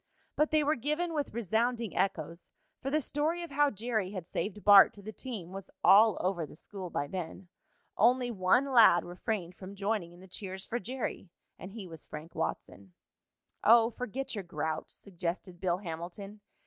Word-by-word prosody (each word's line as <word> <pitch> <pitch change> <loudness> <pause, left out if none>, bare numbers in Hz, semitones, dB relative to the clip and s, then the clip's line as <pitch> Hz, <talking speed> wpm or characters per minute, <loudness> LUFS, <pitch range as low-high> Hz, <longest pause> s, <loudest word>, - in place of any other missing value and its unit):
But 300 +1 +2
they 310 -1 +3
were 295 +1 +2
given 305 +6 -1
with 295 -3 -2
resounding 230 +1 -1
echoes, 170 -3 -2 0.3
for 270 - -2
the 305 +3 +2
story 310 +5 -1
of 340 - -8
how 290 +1 +3
Jerry 220 -3 -2
had 185 -4 -5
saved 205 +3 -4
Bart 205 -1 +8
to 205 - -13
the 215 - -6
team 215 -8 -7
was 195 0 -8
all 215 +1 +7
over 180 -2 0
the 150 - -9
school 185 +2 -7
by 145 - -2
then. 180 +2 -6 0.5
Only 245 +3 +3
one 230 +7 +2
lad 220 -8 +6
refrained 180 0 -3
from 190 +2 -10
joining 200 -3 -2
in 175 - -16
the 190 - -13
cheers 190 +1 -6
for 240 - -2
Jerry, 245 -4 -5 0.3
and 185 - -8
he 215 -4 -7
was 165 -3 -9
Frank 155 +3 -9
Watson. 95 -2 -5 0.7
"Oh, 230 +1 +6
forget 250 +3 -5
your 205 -3 -4
grouch," 160 -2 -3
suggested 175 -1 -5
Bill 180 -2 +1
Hamilton. 185 +3 -7
200 Hz, 175 wpm, -31 LUFS, 180-240 Hz, 0.7 s, Bart